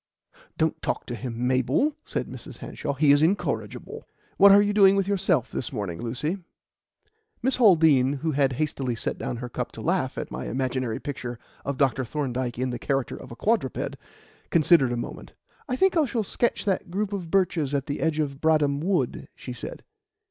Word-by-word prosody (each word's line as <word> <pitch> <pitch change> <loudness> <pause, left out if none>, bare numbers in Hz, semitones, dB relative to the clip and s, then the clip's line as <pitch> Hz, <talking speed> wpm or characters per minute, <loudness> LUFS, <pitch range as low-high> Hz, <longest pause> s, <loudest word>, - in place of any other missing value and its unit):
"Don't 160 -1 0
talk - - -2
to 120 - -5
him, 120 +1 -4
Mabel," 130 - +2
said - - -2
Mrs. - - -9
Hanshaw; 145 - -4
"he 145 +1 +4
is 145 +1 +5
incorrigible. 180 +6 -1 0.3
What 200 +1 +8
are 200 - +8
you 205 0 +2
doing 200 -2 +6
with 195 -1 +1
yourself 190 - +1
this 125 - -3
morning, 100 -9 -4
Lucy?" 145 +11 -2 1.0
Miss 265 +1 +2
Haldean 160 - +5
(who 160 - 0
had 135 -2 +2
hastily 135 -3 -2
set - - -3
down 120 - -3
her 125 +1 -5
cup 120 - -4
to - - -8
laugh - - 0
at - - -4
my - - -5
imaginary 130 -2 -2
picture 125 -4 -5 0.3
of 140 -1 -3
Dr. 135 -2 +2
Thorndyke 125 -2 -3
in 130 0 -1
the 120 - -4
character 135 -2 -1
of - - -11
a - - -7
quadruped) 210 - 0 0.5
considered 160 -5 +4
a 120 - -1
moment. 120 - -7 0.4
"I 250 - 0
think 380 +7 +3
I 320 -3 +4
shall 235 -4 -1
sketch 235 +4 -1
that 190 -3 0
group 200 +3 -2
of 180 -5 -4
birches 165 -6 +1
at 135 -1 -1
the 145 - -3
edge 160 -1 +1
of 140 -3 -2
Bradham 150 -3 +3
Wood," 165 -6 -1
she 125 - -7
said. 120 - -8
145 Hz, 190 wpm, -26 LUFS, 130-190 Hz, 1.0 s, What